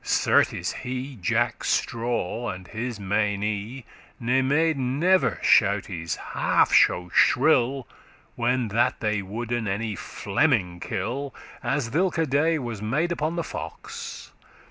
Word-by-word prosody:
Certes -, -, +2 dB
he, 130 Hz, +2 st, -5 dB
Jacke 85 Hz, -, 0 dB
Straw,<35> 115 Hz, -2 st, -1 dB
and 90 Hz, -1 st, -12 dB
his 120 Hz, 0 st, -4 dB
meinie,* 105 Hz, +4 st, -1 dB
*followers -, -, -23 dB
Ne 125 Hz, +3 st, +2 dB
made 150 Hz, +3 st, +2 dB
never 150 Hz, +9 st, +2 dB
shoutes 95 Hz, -6 st, +2 dB, 0.2 s
half -, -, +2 dB
so 90 Hz, 0 st, +4 dB
shrill 130 Hz, -1 st, +3 dB, 0.5 s
When 120 Hz, -1 st, 0 dB
that 115 Hz, +4 st, +1 dB
they 105 Hz, -2 st, 0 dB
woulden 115 Hz, +3 st, -3 dB
any 105 Hz, +2 st, -2 dB
Fleming 100 Hz, -, 0 dB
kill, 140 Hz, +8 st, -4 dB, 0.3 s
As 135 Hz, -4 st, -1 dB
thilke 165 Hz, 0 st, +1 dB
day 155 Hz, +4 st, +2 dB
was 120 Hz, -7 st, -5 dB
made 145 Hz, +11 st, 0 dB
upon 160 Hz, 0 st, -1 dB
the 170 Hz, -, -1 dB
fox. -, -, -7 dB
120 Hz, 120 wpm, -25 LUFS, 105-140 Hz, 0.5 s, so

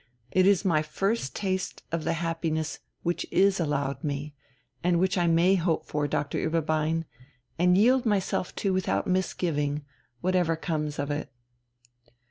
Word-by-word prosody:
It 185 Hz, 0 st, +4 dB
is 200 Hz, 0 st, +4 dB
my 160 Hz, -5 st, +3 dB
first 195 Hz, -, -1 dB
taste 190 Hz, -2 st, -2 dB
of 165 Hz, -2 st, -2 dB
the 165 Hz, -, +1 dB
happiness 165 Hz, -1 st, -2 dB, 0.2 s
which 175 Hz, 0 st, 0 dB
is 195 Hz, 0 st, +3 dB
allowed 145 Hz, -2 st, -1 dB
me, 145 Hz, 0 st, -3 dB, 0.5 s
and 175 Hz, 0 st, +3 dB
which 185 Hz, +1 st, +2 dB
I 175 Hz, -2 st, +2 dB
may 170 Hz, +3 st, +4 dB
hope 170 Hz, -3 st, +1 dB
for, 150 Hz, -1 st, -1 dB
Doctor 145 Hz, 0 st, -1 dB
Ueberbein, 160 Hz, 0 st, 0 dB, 0.5 s
and 180 Hz, +1 st, +5 dB
yield 250 Hz, +5 st, +5 dB
myself 200 Hz, -5 st, 0 dB
to 195 Hz, -2 st, 0 dB
without 185 Hz, 0 st, 0 dB
misgiving, 155 Hz, -6 st, -1 dB, 0.3 s
whatever 180 Hz, -1 st, +1 dB
comes 150 Hz, -2 st, -3 dB
of 145 Hz, +1 st, -2 dB
it...." 145 Hz, -3 st, -3 dB
165 Hz, 145 wpm, -27 LUFS, 155-185 Hz, 0.5 s, and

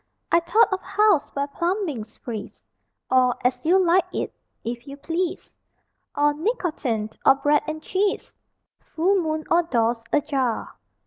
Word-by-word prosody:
I 335 Hz, -, +6 dB
thought 380 Hz, +5 st, +3 dB
of 380 Hz, -, -2 dB
"House 405 Hz, -4 st, +2 dB
Where 280 Hz, 0 st, 0 dB
Plumbings 310 Hz, -, -3 dB
Freeze," 220 Hz, -4 st, -7 dB, 0.5 s
Or 255 Hz, -1 st, +4 dB
"As 250 Hz, -, +1 dB
You 345 Hz, +4 st, +4 dB
Like 370 Hz, 0 st, +3 dB
it," -, -, -3 dB, 0.3 s
"If 235 Hz, +2 st, -5 dB
You 280 Hz, 0 st, -8 dB
Please," 340 Hz, +4 st, -3 dB, 0.6 s
Or 295 Hz, 0 st, +3 dB
"Nicotine" 300 Hz, -, -2 dB
or 270 Hz, -, +7 dB
"Bread 290 Hz, +2 st, +2 dB
and 310 Hz, 0 st, -5 dB
Cheese," 390 Hz, +2 st, -1 dB, 0.5 s
"Full 370 Hz, +4 st, +1 dB
Moon" 310 Hz, -1 st, -2 dB
or 340 Hz, -, +5 dB
"Doors 235 Hz, -7 st, 0 dB
Ajar." 275 Hz, -6 st, 0 dB
310 Hz, 140 wpm, -24 LUFS, 260-360 Hz, 0.6 s, or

